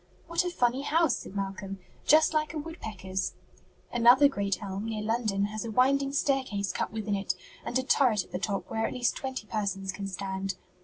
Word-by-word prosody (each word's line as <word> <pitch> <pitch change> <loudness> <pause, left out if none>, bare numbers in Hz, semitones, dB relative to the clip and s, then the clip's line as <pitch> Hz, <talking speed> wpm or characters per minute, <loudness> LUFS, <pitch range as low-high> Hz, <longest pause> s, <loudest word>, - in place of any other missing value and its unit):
"What 335 +1 +1
a 355 - -1
funny 250 -6 +1
house!" 310 -1 +2
said 195 - -9
Malcolm. 195 0 -4 0.3
"Just 315 +1 +6
like 310 +1 0
a - - -1
woodpecker's." 210 - -4 0.6
"Another 245 +4 +7
great 200 -7 -1
elm, 195 +1 -4
near 215 -2 -3
London, 215 -3 +1
has 215 +1 -4
a 230 - -4
winding 275 +4 +3
staircase 260 -8 0
cut - - -2
within 215 -1 -2
it, 195 -2 -1 0.3
and 245 - -1
a 260 - 0
turret 245 -7 +3
at - - -21
the 180 - -2
top 200 0 -2
where 225 0 0
at - - -5
least 245 -2 +1
twenty 260 -4 -4
persons 195 -3 -2
can 195 +1 -5
stand. 190 0 -3
220 Hz, 195 wpm, -29 LUFS, 195-265 Hz, 0.6 s, Another